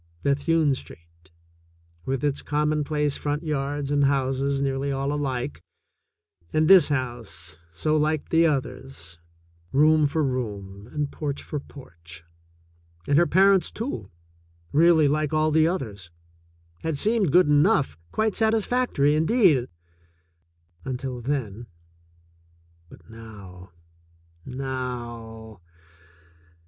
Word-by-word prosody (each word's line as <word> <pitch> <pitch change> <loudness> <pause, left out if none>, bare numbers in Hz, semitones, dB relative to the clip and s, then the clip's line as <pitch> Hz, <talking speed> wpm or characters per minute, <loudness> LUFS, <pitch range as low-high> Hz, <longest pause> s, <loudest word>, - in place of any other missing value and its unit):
Bethune 145 +1 +2
Street, 85 -7 -12 0.8
with 135 0 -2
its 145 -1 0
commonplace 150 -1 0
front 145 +2 -3
yards 145 -2 -2
and 145 -1 +3
houses 135 0 0
nearly 135 0 -1
all 135 +1 -1
alike, 135 -2 -3 0.9
and 155 0 +2
this 185 -4 +7
house, 115 - -5
so 155 - -1
like 155 0 0
the 165 0 +4
others, 130 - -4 0.5
room 155 +1 +4
for 155 +2 -1
room 105 -6 -4
and 145 -1 -2
porch 145 -2 -4
for 150 - -4
porch, 85 - -14 0.8
and 145 - +4
her 170 - +4
parents, 195 +1 +4
too, 165 - -5 0.6
really 160 0 +5
like 150 +1 0
all 155 0 +2
the 160 +1 +4
others, 105 - -4 0.7
had 160 -3 -3
seemed 210 -1 +1
good 180 +4 +6
enough, 145 - +3 0.2
quite 220 -1 0
satis 220 -1 +1
factory, 245 - +1
indeed, 160 - +3 1.2
until 125 -1 -5
then. 120 -4 -3 1.2
But - - -17
now, 100 -5 -12 0.8
now 120 -5 -6
140 Hz, 110 wpm, -25 LUFS, 120-155 Hz, 1.2 s, this